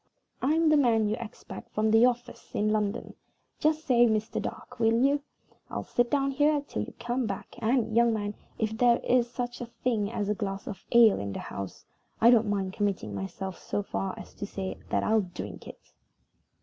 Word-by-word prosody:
"I'm 315 +4 +3
the 305 - +5
man 230 -6 +3
you 215 - 0
expect 230 -2 -9
from 215 0 +2
the 225 +3 +7
office 245 0 -4
in 210 +1 +2
London. 210 -1 -1 0.5
Just 310 +1 +1
say 240 -2 +5
Mr. 220 -1 0
Dark, 250 -1 -7
will 225 0 +3
you? 285 +1 +2 0.5
I'll - - -4
sit 240 0 +1
down 275 0 +1
here 295 +2 +3
till - - -3
you - - -7
come 240 0 -1
back; 195 - -5
and, 230 -1 +1
young 235 0 +5
man, 205 -2 -2 0.2
if 220 0 -1
there 240 0 +4
is 245 -1 +3
such 245 0 -4
a 240 - -4 0.2
thing 220 -4 +1
as 205 -3 -2
a 210 - +2
glass 195 -2 -4
of 195 -3 -7
ale 235 -3 +7
in 100 0 -4
the - - -4
house, 100 -1 -7 0.3
I 235 +2 +7
don't 225 -3 +4
mind 195 -2 -1
committing 200 - -1
myself 140 - -5
so 205 - -2
far 195 -1 -3
as - - -10
to 200 - -6
say 190 -2 -5
that - - +1
I'll 220 0 +3
drink 180 -2 -8
it." - - -13
225 Hz, 200 wpm, -28 LUFS, 205-245 Hz, 0.5 s, the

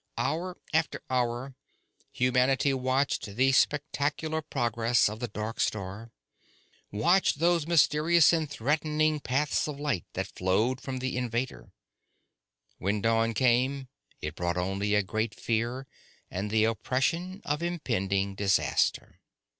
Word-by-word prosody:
Hour 180 +3 -2 0.2
after 160 0 0
hour 125 +1 -1 0.6
humanity 125 +2 +2
watched 130 +1 0
the 130 +3 +3
spectacular 150 +3 0
progress 120 -4 +1
of 105 +2 -5
the 120 - -3
dark 110 +1 -5
star, 105 +2 -2 0.8
watched 170 - +3
those 170 0 +2
mysterious 165 +1 +4
and 160 -3 0
threatening 150 +3 0
paths 145 +3 0
of 145 -2 -6
light 140 - -1
that - - -2
flowed 110 +8 0
from 130 -1 -4
the 130 0 -3
invader. 125 +1 -3 1.1
When 100 +3 0
dawn 115 +1 +1
came, 130 +3 +1 0.3
it - - -3
brought 85 0 -2
only 100 +3 0
a 105 - +3
great 110 +2 -2
fear 120 +3 -1 0.5
and 100 +3 -3
the 110 +1 +2
oppression 135 - -1
of 150 +2 -1
impending 100 - -1
disaster. 95 -1 0
130 Hz, 120 wpm, -28 LUFS, 110-150 Hz, 1.1 s, mysterious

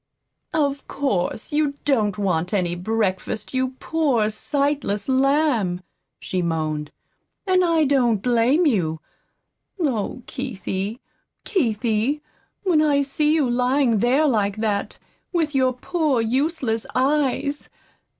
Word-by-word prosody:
"Of 285 -2 0
course, 220 -8 -2
you 295 -2 +1
don't 215 -9 +1
want 180 -2 0
any 175 -3 0
breakfast, 195 +3 -2
you 260 0 -1
poor, 270 -10 +1
sightless 275 -4 -1
lamb," 265 - +2 0.4
she 185 - -2
moaned. 155 -3 -2 0.6
"And 370 -2 +3
I 330 -2 +3
don't 255 -5 +3
blame 245 - +3
you. 170 - +1 0.8
Oh, 255 - -1
Keithie, 215 -4 -4 0.4
Keithie, 240 - 0 0.4
when 350 -6 +3
I 285 -2 +3
see 295 +2 0
you 310 -4 +2
lying 250 -1 +2
there 260 +8 +3
like 210 -5 +1
that, 210 -2 -1 0.3
with 325 -4 0
your 260 -1 +3
poor 290 +1 0
useless 245 -1 0
eyes 280 +1 0
255 Hz, 110 wpm, -22 LUFS, 210-290 Hz, 0.8 s, And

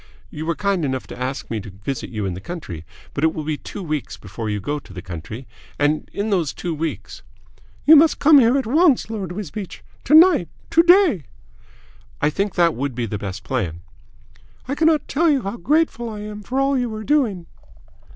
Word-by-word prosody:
You 155 +1 -6
were 170 - 0
kind 200 -4 0
enough 130 -2 -2
to - - -10
ask 130 0 -4
me 110 - -1
to 105 +1 -9
visit 105 +8 -5
you 105 -3 -3
in 95 - -2
the 90 - -7
country, 95 - -7 0.3
but 140 - -3
it 160 - +2
will 155 - -3
be 155 0 -2
two 200 - -8
weeks 155 -4 -4
before 105 +3 -6
you 105 0 -1
go 145 +9 -3
to 100 - -15
the 90 - -7
Country, 95 +8 -8 0.3
and 145 +1 0
in 205 +2 -2
those 170 -8 0
two 175 -2 -3
weeks 160 +1 -5 0.3
" - - -30
"You 315 - +9
must 315 +1 +5
come 295 -1 +7
here 245 +2 +4
at 270 - -1
once, 285 -2 +3
Lord 195 -6 -4
Wisbeach. 195 0 -7 0.2
To 300 - +5
night. 320 - +6 0.2
To 335 - +6
day." 345 - +5 0.9
"I 145 - +2
think 200 +5 -2
that 170 -2 +4
would 135 0 -3
be 120 -1 -1
the 105 -2 -4
best 100 -2 -6
plan." 85 -10 -3 0.8
"I 270 - -2
cannot 315 0 +2
tell 330 +4 +2
you 280 -4 +2
how 200 +4 -4
grateful 250 - +1
I 210 -2 -7
am 210 0 -7
for 255 +6 -2
all 275 0 +2
you 245 -3 -1
are 215 - -6
doing." 225 - +1
175 Hz, 210 wpm, -21 LUFS, -, 0.9 s, You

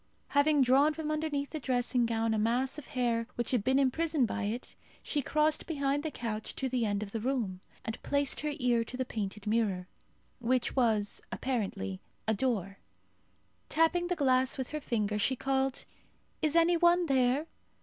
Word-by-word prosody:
Having 285 0 +4
drawn 275 +4 +4
from 310 -1 -3
underneath 300 -2 -2
the 310 - -3
dressing 245 -2 +1
gown 225 -1 0
a 220 - +1
mass 245 +6 +1
of 290 - -12
hair 240 -4 0
which 240 -1 -2
had 245 -6 +1
been 260 +3 +3
imprisoned 280 0 +2
by 220 -1 -2
it, 225 +4 -4 0.3
she 295 - -1
crossed 305 +3 +1
behind 280 -2 0
the 315 - -3
couch 220 -6 -4
to 265 - -1
the 245 -3 0
end 205 0 -1
of 200 - -8
the 225 - -2
room, 220 -7 -2 0.2
and 225 0 -4
placed 285 -1 0
her 300 -1 -2
ear 245 -4 +2
to 250 +2 -8
the 260 - -1
painted 210 -3 -4
mirror, 210 -5 0 0.5
which 245 +1 0
was, 220 -5 +1
apparently, 195 - -2 0.3
a 220 - +3
door. 200 -4 -1 0.9
Tapping 335 +2 +2
the 360 - 0
glass 260 -4 +2
with 260 -2 -3
her 305 0 -4
finger, 210 -5 -1
she 260 +6 +2
called, 270 0 0 0.6
"Is 305 0 +1
any 335 +1 +5
one 345 +1 +4
there? 265 +1 +2
255 Hz, 180 wpm, -31 LUFS, 225-290 Hz, 0.9 s, any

